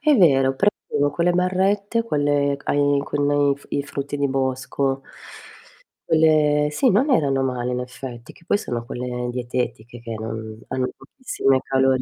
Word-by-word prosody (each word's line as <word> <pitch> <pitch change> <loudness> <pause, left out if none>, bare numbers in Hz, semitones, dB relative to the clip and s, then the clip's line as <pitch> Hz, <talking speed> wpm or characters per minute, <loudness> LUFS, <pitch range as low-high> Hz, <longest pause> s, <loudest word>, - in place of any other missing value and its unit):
È 300 0 +4
vero, 135 -8 +4
prendevo 145 -6 0
quelle 170 +4 +1
barrette, 195 +5 +1
quelle 145 -7 +1
ai 145 0 +2
con 145 -1 +1
i 140 - -1
f 140 - -15
frutti 140 +1 -4
di 140 -1 0
bosco 135 +1 -1 1.1
quelle 155 -2 +4
sì, 250 - +2
non 280 +4 +3
erano 140 - +2
male 125 -1 -2
in 125 - -1
effetti, 125 -1 -8
che - - -21
poi - - +2
sono 120 - -4
quelle 125 0 -4
dietetiche 120 -1 -4
che 115 -1 -6
non 110 0 -6
hanno 130 -1 -1
pochissime 135 - 0
calorie. 130 -1 +2
140 Hz, 150 wpm, -22 LUFS, 125-150 Hz, 1.1 s, È